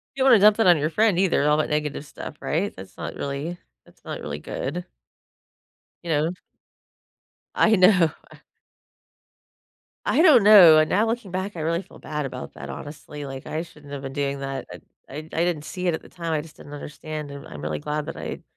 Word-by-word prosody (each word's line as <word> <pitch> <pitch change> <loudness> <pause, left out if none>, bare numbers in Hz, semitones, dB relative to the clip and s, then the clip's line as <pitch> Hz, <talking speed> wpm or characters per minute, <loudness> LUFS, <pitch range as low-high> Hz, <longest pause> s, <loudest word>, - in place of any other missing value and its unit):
You 265 - 0
don't 265 - +6
wanna 230 - +8
dump 210 +1 +7
that 225 - +3
on 175 -2 +7
your 150 +1 0
friend 210 +1 +2
either, 180 -6 +2
all 150 - +4
that 155 - 0
negative 150 -1 -2
stuff, 150 - -9
right? 180 +7 -1
That's 95 0 -12
not - - -6
really 140 +5 -4 0.3
that's - - -24
not - - -6
really 75 0 -5
good. - - -5 1.2
You 170 - -5
know? 155 +2 +2 1.2
I 220 0 +4
know. 185 -4 +5 2.0
I 320 - +3
don't 305 - +7
know, 195 -7 +9
and 155 0 +3
now 210 +4 +2
looking 225 -3 -3
back, 190 +1 -4
I - - -5
really 170 +3 0
feel - - -16
bad 150 -2 -4
about 135 - -7
that, 70 +1 -8
honestly, 145 - -8
like, 135 -1 -8
I 155 - -3
shouldn't 150 -4 -14
have 140 - -5
been 135 -1 -6
doing 140 -1 -2
that. 135 0 -4
I - - -10 0.3
I 135 - -8
I - - -3 0.2
didn't 165 -4 -1
see 180 +3 -5
it 170 - +2
at - - -3
the - - -15
time, 170 -2 -5
I 155 - +1
just 150 0 -13
didn't 145 - -13
understand, 150 +1 -7
and 140 0 -9
I'm 75 - -9
really 75 0 -3
glad 150 - -3
that - - -6
I - - -6
155 Hz, 210 wpm, -24 LUFS, 145-185 Hz, 2.0 s, know